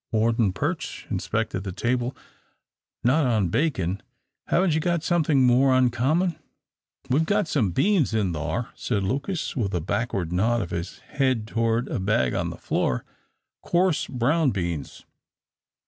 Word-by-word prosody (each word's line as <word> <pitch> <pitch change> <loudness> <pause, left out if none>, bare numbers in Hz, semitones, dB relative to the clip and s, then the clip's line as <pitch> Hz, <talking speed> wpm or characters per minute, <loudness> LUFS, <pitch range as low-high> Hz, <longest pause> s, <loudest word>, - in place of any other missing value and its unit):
Warden 110 -2 +2
Perch 95 - -3
inspected 95 - -2
the 95 - -4
table. 120 +5 -1 0.9
"Not 135 +4 +3
on 110 -7 +1
bacon 100 - 0 0.5
haven't 180 -2 +2
you 160 - +2
got 170 0 0
something 155 -6 +2
more 130 +2 +4
uncommon?" 140 +8 +1 0.7
"We've 145 +5 +4
got 205 +2 +1
some 125 - +1
beans 160 - +2
in 105 -6 0
thar," 80 +10 -3
said 105 -5 -2
Lucas, 140 - -2
with 100 -8 -1
a - - +1
backward 95 -1 -2
nod 115 +6 +2
of 85 - -4
his 85 +2 -4
head 130 -6 0
toward 115 +1 0
a - - -2
bag 95 - +1
on - - -1
the - - -7
floor, 60 - -1 0.6
"coarse 175 -4 +1
brown 140 +5 +2
beans. 85 - -4
120 Hz, 145 wpm, -25 LUFS, 100-150 Hz, 0.9 s, more